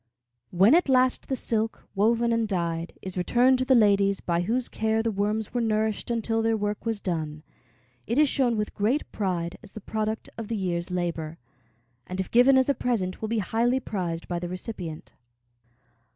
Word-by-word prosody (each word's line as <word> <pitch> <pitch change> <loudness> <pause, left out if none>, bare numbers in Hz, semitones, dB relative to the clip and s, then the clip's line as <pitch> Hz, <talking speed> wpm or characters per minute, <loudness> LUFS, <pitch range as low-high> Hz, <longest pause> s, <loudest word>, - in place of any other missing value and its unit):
When 195 +8 +5
at 340 -3 +4
last 255 -1 +3
the 265 - +1
silk, 225 -2 -2
woven 230 +3 +2
and 230 -1 +1
dyed, 170 -3 -3
is 185 -1 -4
returned 250 +7 +3
to 255 - 0
the 260 - +4
ladies 200 -3 +4
by 170 -1 0
whose 235 +7 -1
care 220 0 0
the 225 - 0
worms 210 +1 -1
were 245 - 0
nourished 220 -1 0
until 225 -1 0
their 225 0 +1
work 210 +2 -3
was 225 -2 -1
done, 155 -5 -3 0.6
it 235 - -1
is 300 0 +5
shown 250 -4 +1
with 210 0 -2
great 230 +9 0
pride 180 -4 -2
as 215 -4 -14
the - - -7
product 215 +2 -3
of 225 - -5
the 225 - -2
year's 175 -2 -2
labor, 170 -3 -3 0.7
and 185 +1 -5
if 190 - -3
given 255 +3 +6
as 260 - +3
a 280 - +3
present 215 -9 -2
will 220 - -3
be 230 - 0
highly 240 +6 +1
prized 175 -8 -4
by 175 -1 -2
the 175 0 -5
recipient. 180 -4 -7
215 Hz, 190 wpm, -26 LUFS, 185-235 Hz, 0.7 s, given